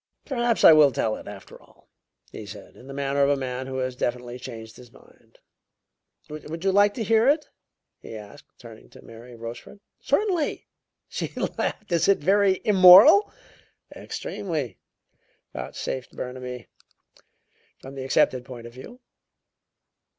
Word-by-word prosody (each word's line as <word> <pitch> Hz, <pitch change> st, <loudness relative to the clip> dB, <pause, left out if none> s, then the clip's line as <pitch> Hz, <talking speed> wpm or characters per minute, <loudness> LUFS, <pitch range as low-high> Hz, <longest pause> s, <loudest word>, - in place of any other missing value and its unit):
"Perhaps 240 Hz, -4 st, -1 dB
I -, -, +10 dB
will 150 Hz, -2 st, +6 dB
tell 110 Hz, -3 st, -1 dB
it, -, -, -13 dB
after 100 Hz, -1 st, -12 dB
all," -, -, -25 dB, 0.4 s
he 105 Hz, -, -9 dB
said, 105 Hz, +1 st, -12 dB
in 130 Hz, -, -16 dB
the -, -, -9 dB
manner 140 Hz, 0 st, -1 dB
of 140 Hz, -, +3 dB
a 145 Hz, -, +2 dB
man 130 Hz, -1 st, -5 dB
who 130 Hz, 0 st, -5 dB
has 130 Hz, -1 st, -3 dB
definitely 125 Hz, 0 st, -4 dB
changed 115 Hz, -3 st, -10 dB
his 125 Hz, -2 st, -15 dB
mind. -, -, -23 dB, 0.9 s
"Would 155 Hz, +2 st, -8 dB
you 195 Hz, -, +2 dB
like 205 Hz, +1 st, +3 dB
to 230 Hz, -, -3 dB
hear 225 Hz, +3 st, +3 dB
it?" 300 Hz, +1 st, +1 dB, 0.5 s
he 115 Hz, -, -10 dB
asked, 110 Hz, +7 st, -12 dB
turning 115 Hz, -3 st, -14 dB
to -, -, -16 dB
Mary 120 Hz, +2 st, -13 dB
Rochefort. 115 Hz, -, -10 dB, 0.2 s
"Certainly!" 370 Hz, -8 st, -1 dB, 0.4 s
she -, -, -4 dB, 0.3 s
laughed. 210 Hz, -, -4 dB
"Is 170 Hz, -2 st, +2 dB
it 200 Hz, -, +4 dB
very 195 Hz, +3 st, +2 dB
immoral?" 195 Hz, -, +8 dB, 0.6 s
"Extremely," 150 Hz, -, -5 dB, 0.7 s
vouchsafed 130 Hz, -2 st, -6 dB
Burnaby, 125 Hz, -1 st, -7 dB, 1.1 s
"from 135 Hz, -, -11 dB
the 135 Hz, -1 st, -6 dB
accepted 130 Hz, -1 st, +1 dB
point 125 Hz, -2 st, -11 dB
of 120 Hz, -, -11 dB
view." 240 Hz, -, -13 dB
135 Hz, 145 wpm, -24 LUFS, 125-195 Hz, 1.1 s, I